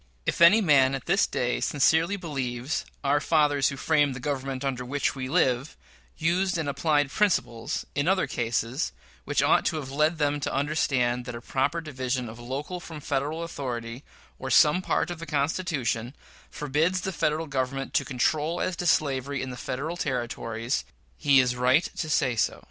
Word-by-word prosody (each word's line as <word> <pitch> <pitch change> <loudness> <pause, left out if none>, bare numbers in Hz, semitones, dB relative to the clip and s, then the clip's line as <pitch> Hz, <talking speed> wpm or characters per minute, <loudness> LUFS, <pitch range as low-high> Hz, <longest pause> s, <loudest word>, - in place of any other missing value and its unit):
If - - -1
any 195 +7 +8
man 135 -7 +4
at 135 - -7
this 195 +4 +3
day 125 0 -1
sincerely 160 +6 +2
believes 135 -5 -3 0.2
"our 140 +1 +3
fathers, 145 -3 +2
who 140 - -6
framed 145 -2 +2
the - - -6
Government 135 -1 -3
under 130 -2 -2
which 140 +3 -1
we 130 -2 -5
live," 130 +1 +1 0.4
used 175 +3 +1
and 160 -3 -2
applied 145 0 +1
principles, 120 - 0
in 145 +2 0
other 190 0 +3
cases, 120 +3 -2 0.3
which - - +1
ought - - +4
to 160 - 0
have 140 -4 -5
led 155 +4 +1
them 145 -1 +1
to - - -2
understand 135 -4 0
that 120 -1 -6
a - - -5
proper 135 +7 -1
division 130 -5 -3
of 115 +2 -10
local 140 +9 -5
from 160 -3 -9
Federal 145 +3 -2
authority, 125 -5 -5 0.4
or 130 - -5
some 150 +7 +5
part 185 - 0
of 175 - -6
the 165 - -7
Constitution, 145 -5 -1 0.3
forbids 155 +6 0
the 190 - -3
Federal 155 0 0
Government 135 -1 -3
to - - +2
control 150 +6 0
as 185 - -1
to 175 - -2
slavery 140 -3 +1
in 130 - -5
the - - -6
Federal 140 +7 -4
Territories, 120 -3 -2 0.3
he 140 -3 +4
is 125 -1 +2
right 130 +6 +3
to 160 - -3
say 130 -5 +2
so. 110 - 0
140 Hz, 175 wpm, -26 LUFS, 130-160 Hz, 0.4 s, any